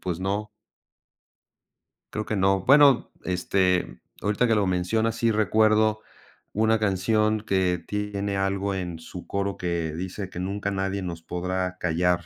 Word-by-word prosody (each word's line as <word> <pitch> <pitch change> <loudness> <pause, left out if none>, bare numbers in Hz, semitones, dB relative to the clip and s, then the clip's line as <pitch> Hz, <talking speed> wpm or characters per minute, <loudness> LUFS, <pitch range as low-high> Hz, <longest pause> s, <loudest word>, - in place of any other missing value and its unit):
pues, 90 -3 -3
no 100 +3 -2 1.7
creo 110 - -2
que 110 - -2
no 95 0 +2
bueno, 140 -2 +6
este, 90 -5 0 0.2
ahorita 105 +4 +1
que 115 - +3
lo 105 -2 +2
mencionas 110 +5 0
sí 115 -1 +2
recuerdo 110 +1 +3 0.5
una 110 +1 +2
canción 105 +2 +1
que 90 -4 0
tiene 105 -1 -2
algo 95 0 0
en 90 -3 -4
su 85 +2 -10
coro 100 -1 -2
que 85 -3 -2
dice: 95 +2 -5
"Que 90 - -7
nunca 100 +2 -2
nadie 95 0 -2
nos 85 -2 -5
podrá 90 +2 -3
callar", 90 0 +1
95 Hz, 140 wpm, -25 LUFS, 90-105 Hz, 1.7 s, bueno